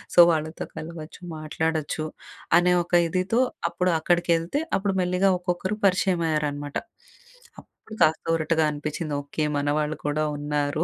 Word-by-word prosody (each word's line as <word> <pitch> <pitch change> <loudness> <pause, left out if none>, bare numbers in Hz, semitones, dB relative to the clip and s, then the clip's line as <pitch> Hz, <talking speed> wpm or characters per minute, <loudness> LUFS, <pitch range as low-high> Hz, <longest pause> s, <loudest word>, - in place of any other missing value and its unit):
So, - - +6
వాళ్ళతో 160 0 -2
కలవచ్చు, 160 0 -8 0.2
మాట్లాడొచ్చు. 155 0 -2 0.5
అనే 180 +1 +4
ఒక 175 - -19
ఇదితో 185 +6 0 0.3
అప్పుడు 180 0 0
అక్కడికెళ్తే, 170 - +1 0.2
అప్పుడు 195 0 -1
మెల్లిగా 180 +2 +2
ఒక్కొక్కరు 180 +3 -2
పరిచయం 185 -2 +2
అయ్యారనమాట. 145 -2 -2 0.8
అప్పుడు 220 - -14
కాస్త 155 +1 +2
ఊరటగా 160 0 +1
అనిపిచ్చింది. 150 +1 -4
ఓకే. 140 +2 -3
మనవాళ్ళు 150 +1 0
కూడా 155 +1 0
ఉన్నారు 145 +1 -1
160 Hz, 120 wpm, -25 LUFS, 150-180 Hz, 0.8 s, So